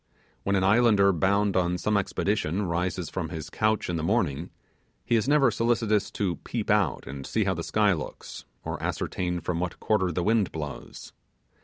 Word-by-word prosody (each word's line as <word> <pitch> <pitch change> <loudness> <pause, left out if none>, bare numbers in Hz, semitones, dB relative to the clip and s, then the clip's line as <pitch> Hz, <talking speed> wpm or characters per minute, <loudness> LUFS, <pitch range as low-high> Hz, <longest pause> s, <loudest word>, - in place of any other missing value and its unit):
When 100 - 0
an 95 - +2
islander 100 -1 +5
bound 100 +3 +2
on 90 -1 +1
some 105 +4 0
expedition 100 -1 0
rises 90 0 -1
from 90 -3 -3
his 80 -3 -6
couch 110 0 +1
in 85 - -1
the 80 - -3
morning, 85 - 0 0.6
he 120 - +2
is 110 +2 +1
never 140 -4 +4
solicitous 115 -3 +1
to 95 -4 -1
peep 115 -3 -3
out 105 -2 +1
and 70 +1 -7
see - - 0
how - - +1
the - - -4
sky 105 -2 +2
looks, 80 - -7 0.2
or - - -4
ascertain 90 -1 -2
from 85 -2 -2
what 90 0 -3
quarter 95 -5 +1
the 85 +1 -1
wind 110 0 +2
blows. 75 -3 -7
95 Hz, 180 wpm, -27 LUFS, 85-110 Hz, 0.6 s, islander